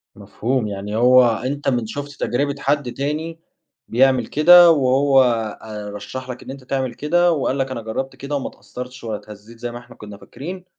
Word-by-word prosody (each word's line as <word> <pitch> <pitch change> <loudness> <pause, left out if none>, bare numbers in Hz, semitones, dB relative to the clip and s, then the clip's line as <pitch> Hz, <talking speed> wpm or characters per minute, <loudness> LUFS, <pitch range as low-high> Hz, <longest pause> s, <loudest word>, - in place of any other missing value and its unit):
مفهوم، 125 -1 -2
يعني 100 +1 -5
هو 125 +1 +6
أنتَ 130 +5 -3
من 120 -4 0
شُفت 145 +5 -6
تجربة 140 +3 0
حد 145 -3 0
تاني 155 +4 -3 0.5
بيعمل 130 0 +3
كده، 175 +3 +7
وهو 135 -1 +4
آآ، 110 -3 -3
رشَّح 130 +6 -7
لك 125 - -7
إن - - -8
أنتَ 135 -1 -10
تعمل 130 -1 -2
كده، 175 +4 +2
وقال 140 -3 0
لك: 135 -1 -2
"أنا 115 - -4
جرَّبت 130 +5 -4
كده 140 +1 -5
وما 140 - -2
اتأثَّرتِش 125 0 -10
ولا 110 -2 -3
اتهزّيت 105 +3 -14
زي 120 0 -4
ما 120 - -7
إحنا 125 - -16
كنّا 105 -1 -11
فاكرين." 180 - -9
130 Hz, 185 wpm, -20 LUFS, 115-140 Hz, 0.5 s, كده